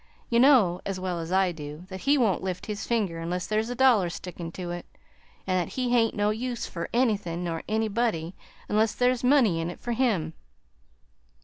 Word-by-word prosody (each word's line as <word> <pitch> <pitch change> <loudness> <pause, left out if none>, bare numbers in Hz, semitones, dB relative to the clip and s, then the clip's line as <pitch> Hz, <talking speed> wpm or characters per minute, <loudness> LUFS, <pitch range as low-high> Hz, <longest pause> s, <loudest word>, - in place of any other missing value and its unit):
You 235 - +4
know 240 -10 +5
as 195 -2 -3
well 185 -2 -2
as 165 +1 -5
I 190 -1 +3
do 150 +1 -8
that 190 -1 -6
he 285 +8 +3
won't 220 -8 +2
lift 185 -1 -4
his 210 -1 -5
finger 205 -8 0
unless 175 +2 -3
there's 215 +2 -1
a 245 - -3
dollar 240 -8 +4
stickin' 170 -1 -7
to 175 -2 -5
it, 175 0 -6 0.6
an' 185 -1 +1
that 175 - -3
he 255 -2 -1
hain't 230 -2 +3
no 205 0 +2
use 240 +2 -3
fur 170 - -5
anythin' 205 -8 0
nor 165 -2 -3
anybody 215 -6 0 0.3
unless 215 +1 +1
there's 250 0 +1
money 250 - +4
in 165 - -2
it 175 - -8
for 240 - -4
him. 215 -10 0
200 Hz, 195 wpm, -27 LUFS, 175-235 Hz, 0.6 s, know